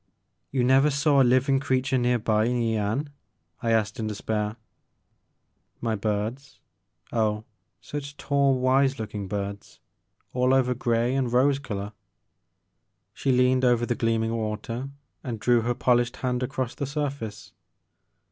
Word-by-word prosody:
*' - - -50
"You 130 -2 +1
never 135 +4 +5
saw 140 0 +3
a - - +7
living 130 +2 +3
creature 130 0 0
near 125 0 +2
by 110 -1 +1
in 125 +1 0
Yian? 115 +5 0 0.5
I 115 - -1
asked 110 -2 +1
in 110 - -2
despair. 105 0 -2 1.2
"My 115 -2 -1
birds, 110 +6 -3 0.5
oh 110 -2 +1 0.4
such 145 -1 -6
tall, 140 -2 +2
wise 130 +1 +2
looking 105 -2 -5
birds, 100 0 -5 0.5
all 125 +1 +3
over 125 -1 +2
grey 120 0 0
and 130 -3 0
rose 135 +3 +3
color." 105 -6 -5 1.2
She 135 - 0
leaned 125 +1 +3
over 120 -1 +3
the 120 - 0
gleaming 115 -1 0
water 115 +4 -3 0.3
and 115 -4 -4
drew 120 +2 +3
her 120 +2 -1
polished 120 -1 +2
hand 125 -1 -1
across 130 -1 -2
the 140 - -4
sur&ce. 140 -7 -4
125 Hz, 140 wpm, -26 LUFS, 110-135 Hz, 1.2 s, a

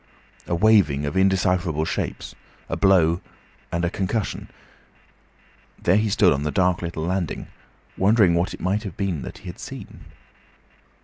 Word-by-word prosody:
A 85 - 0
waving 95 -8 +4
of 75 - -3
indecipherable 90 -4 +2
shapes, 80 - -4 0.4
a - - -1
blow, 90 -3 +3 0.5
and 85 0 0
a - - +1
concussion. 100 +2 -3 1.3
There 90 +3 +3
he 105 0 +1
stood 100 -4 +4
on 70 - -2
the 75 - -1
dark 90 +1 +1
little 85 -2 -4
landing, 90 -1 -2 0.5
wondering 100 -2 +4
what 85 +2 +1
it - - -16
might 100 -1 -2
be 100 -2 -1
that 80 -6 -6
he - - -17
had - - -8
seen. - - -9
90 Hz, 145 wpm, -23 LUFS, 85-100 Hz, 1.3 s, waving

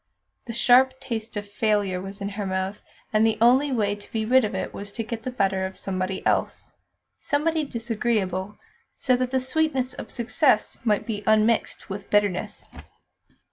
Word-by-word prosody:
The 230 - -6
sharp 260 +3 +4
taste 230 -4 -5
of 205 0 -4
failure 205 -3 0
was 195 +2 -7
in 200 - -2
her 205 0 -4
mouth, 190 +2 -2 0.3
and 215 0 +4
the 225 -1 +3
only 260 +5 +5
way 210 -5 +1
to 205 0 -11
be 220 -1 -1
rid 255 +3 +5
of 215 - -2
it - - -3
was 200 0 -7
to 225 - -3
get 230 0 -5
the 255 - -4
better 195 -6 0
of 190 0 -4
somebody 190 0 -3
else - - 0 0.5
somebody 315 +2 0
disagreeable, 215 -6 -2 0.4
so 255 - +2
that 250 0 -1
the 260 0 +1
sweets 260 -1 0
of - - -8
success 245 0 +1
might 210 -3 +1
be 210 -3 -3
unmixed 220 +1 +2
with 195 0 -7
bitterness. 205 -3 0
220 Hz, 175 wpm, -25 LUFS, 200-250 Hz, 0.5 s, only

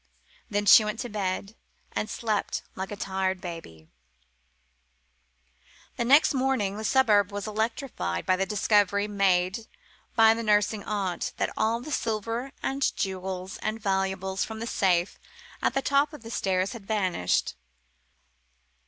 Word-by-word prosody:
Then 205 0 -1
she 215 - +9
went 215 +1 -3
to 245 - -5
bed, 195 -1 -3 0.4
and 215 - -3
slept 215 -1 -2
like 190 +2 -5
a - - -3
tired 190 -2 -2
baby. 165 - -9 2.1
Next 270 +7 +4
morning 255 -7 0
the 215 - -5
suburb 215 -5 +3
was 205 -1 -4
electrified 220 - -2
by 185 - +3
the 195 +1 -1
discovery, 205 -1 +2
made 195 +1 +1 0.5
by 225 -1 +7
the 230 - -3
nursing 210 -1 +2
aunt, 195 -4 -2
that - - -1
all 230 +2 +1
the 305 +5 -8
silver 230 +2 -2
and 275 +1 0
jewels 190 0 -3
and 215 +1 -3
valuables 190 -1 -1
from 220 - -6
the 230 - -4
safe 180 -5 +1 0.4
at - - +1
the 270 - +1
top 280 +2 +2
of 300 - -10
the 225 - -8
stairs 190 -3 0
had 225 -5 -10
vanished. 185 - 0
205 Hz, 140 wpm, -27 LUFS, 190-225 Hz, 2.1 s, she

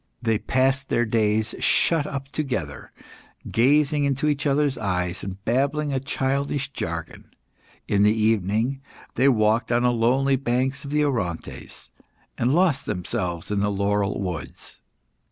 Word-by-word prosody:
They 115 -3 0
passed 135 +2 0
their 120 - +2
days 110 0 +1
shut 160 -3 +2
up 135 -1 -5
together, 125 - -4 0.6
gazing 145 +4 +3
into 140 +1 0
each 150 0 0
other's 140 -1 +2
eyes, 90 -5 -2
and 95 +1 -7
babbling 140 +4 0
a 135 - +1
childish 140 +1 -2
jargon. - - -6 0.6
In 100 - +2
the 105 +1 +5
evening, 110 +4 +1 0.3
they 130 +3 +4
walked 115 0 +2
on 120 +1 +2
the 125 - +4
lonely 130 +4 +2
banks 130 +1 -1
of 140 - -7
the 150 +1 +2
Orontes, 100 - -4 0.4
and 120 +2 +1
lost 165 -3 +2
themselves 90 -1 -3
in 105 - +1
the 105 +1 +1
laurel 100 0 0
woods. 90 -6 -6
125 Hz, 140 wpm, -24 LUFS, 105-140 Hz, 0.6 s, the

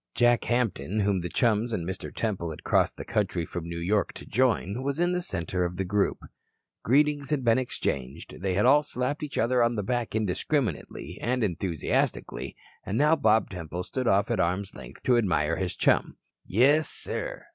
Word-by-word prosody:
Jack 120 -1 +3
Hampton, 110 - 0
whom 100 -1 +1
the 90 - -4
chums 115 +3 +1
and 90 -7 -2
Mr. 95 0 -5
Temple 95 -7 -2
had 80 - -8
crossed - - +2
the - - -7
country 85 - -1
from 85 0 -6
New 85 - -5
York 100 +5 0
to - - -9
join, 115 -2 +1
was 140 +3 -2
in 175 +1 +2
the 180 0 0
center 90 - -2
of 90 0 -2
the 95 - -1
group. 100 +2 +1 0.7
Greetings 145 +2 +2
had 150 -4 0
been 115 +1 +4
exchanged, 70 - -4
they 95 -1 0
had 105 - +2
all 145 +4 +6
slapped 140 0 -2
each 150 -2 -5
other 120 +2 +2
on 120 0 +2
the 105 - -2
back 120 +1 -2
indiscriminately 110 - -2
and 125 +1 0
enthusiastically, 90 -4 -1 0.3
and 100 +3 -3
now 150 +4 +4
Bob 110 -8 +2
Temple 90 -1 -5
stood 130 +5 -3
off 100 +3 +3
at 115 - 0
arm's 95 +3 0
length 65 -3 -12
to 125 -2 +4
admire 85 -7 +1
his 95 -2 -2
chum. - - +2 0.3
"Yes, 140 - +4
sir. - - -1
110 Hz, 190 wpm, -27 LUFS, 90-125 Hz, 0.7 s, all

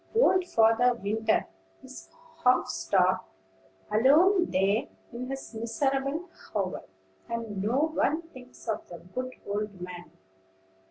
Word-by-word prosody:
Old 375 -6 +4
Father 230 -1 +4
Winter 220 +1 0 0.4
is 260 0 -11 0.3
half 250 -1 +4
starved, 185 -6 +2 0.7
alone 330 - +5
there 195 +4 +2 0.3
in 245 +2 -5
his 270 -2 -6
miserable 270 +8 -1 0.3
hovel; 195 -3 -2 0.4
and 225 -4 -3
no 265 +10 +1
one 320 +1 +1
thinks 255 -7 -15
of 220 - -2
the 175 - -9 0.2
good 255 0 -3
old 205 -1 -3
man. 175 0 -8
235 Hz, 115 wpm, -28 LUFS, 205-270 Hz, 0.7 s, alone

